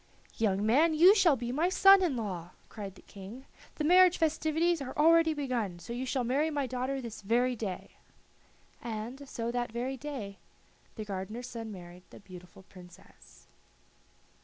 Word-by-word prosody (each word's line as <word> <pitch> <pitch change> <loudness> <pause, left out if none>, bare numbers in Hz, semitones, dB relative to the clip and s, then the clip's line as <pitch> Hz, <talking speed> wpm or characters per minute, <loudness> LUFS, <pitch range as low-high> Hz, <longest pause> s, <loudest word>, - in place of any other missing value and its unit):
"Young 205 -2 0
man, 305 +9 +3
you 355 +6 +7
shall 360 -8 +4
be 240 -1 -4
my 315 +7 +1
son 390 +1 +6
in 340 -8 0
law," 185 -7 -5 0.2
cried 200 -3 -8
the - - -17
King. 210 +7 -11 0.3
"The 305 - -3
marriage 360 +2 +5
festivities 320 +1 0
are 260 +1 -7
already 325 +1 +4
begun, 245 -10 -3
so 175 +7 -8
you 255 +2 -4
shall 255 -1 -1
marry 275 +6 0
my 290 -3 -2
daughter 255 +2 -3
this 235 -4 -8
very 245 +5 +1
day." 210 -5 -6 0.9
And 240 +5 -7
so 230 0 -4
that 240 -1 -3
very 250 +3 -4
day 245 -8 -7 0.6
the 215 - -6
gardener's 210 +5 -6
son 225 -2 -7
married 175 -2 -11
the - - -14
beautiful 180 -1 -14
Princess. 180 -2 -17
245 Hz, 160 wpm, -30 LUFS, 210-295 Hz, 0.9 s, you